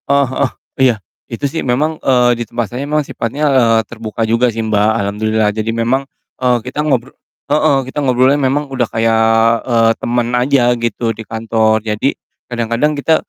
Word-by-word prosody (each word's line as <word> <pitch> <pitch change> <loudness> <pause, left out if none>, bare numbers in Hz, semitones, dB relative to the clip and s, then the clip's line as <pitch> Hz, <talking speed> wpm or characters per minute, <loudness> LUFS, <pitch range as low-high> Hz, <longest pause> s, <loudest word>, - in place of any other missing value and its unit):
Heeh 140 0 +4
heeh, 130 0 0 0.3
iya, 130 -3 +4 0.3
itu 115 +5 -4
sih 140 +4 -2
memang, 150 +6 -1
eee, 125 -2 +3
di - - 0
tempat 120 -3 -3
saya 125 - -4
memang 150 0 0
sifatnya, 140 +4 -3
eee, 115 -3 +4
terbuka 115 -1 -4
juga 115 +2 +2
sih, 115 -1 -3
Mbak, 105 -1 +2
alhamdulillah, 110 +1 0
jadi 110 +1 -3
memang, 120 +4 0 0.3
eee, 125 -1 +3
kita 140 +4 -3
ngobro 135 -4 -1 0.4
heeh, 150 -2 +3
kita 140 - -4
ngobrolnya 130 +1 +3
memang 140 +2 0
udah 125 -3 0
kayak, 115 0 +1 0.5
eee, 115 -2 +3
temen 120 0 0
aja 125 0 +3
gitu 115 0 -1
di 110 - -9
kantor. 110 -1 0
Jadi, 110 +5 -1 0.3
kadang-kadang 120 +5 0
kita 160 +3 +2
120 Hz, 170 wpm, -15 LUFS, 115-135 Hz, 0.5 s, Heeh